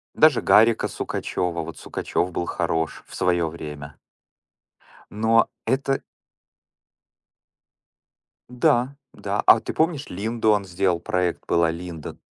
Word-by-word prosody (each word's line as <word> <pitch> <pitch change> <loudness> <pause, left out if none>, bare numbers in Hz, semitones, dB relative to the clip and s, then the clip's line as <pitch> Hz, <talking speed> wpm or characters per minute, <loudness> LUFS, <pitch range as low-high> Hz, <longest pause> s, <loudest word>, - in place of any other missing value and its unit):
Даже 155 -5 +5
Гарика 115 +1 +4
Сукачёва. 85 -2 -3
Вот - - -8
Сукачёв 90 - -2
был 85 - -2
хорош 80 -2 -2
в - - -11
своё 85 -2 +1
время. 75 -3 -8 1.2
Но 110 +2 +3 0.2
это 135 +3 0 2.5
Да, 125 +2 +1 0.2
да. 100 +1 -2
А 115 - +7
ты - - -6
помнишь, 160 -3 0
Линду 110 +4 0
он 105 -2 +1
сделал 90 -1 0
проект? 90 -1 -1
Была 85 -1 +2
Линда. 85 -2 -7
95 Hz, 110 wpm, -23 LUFS, 85-115 Hz, 2.5 s, А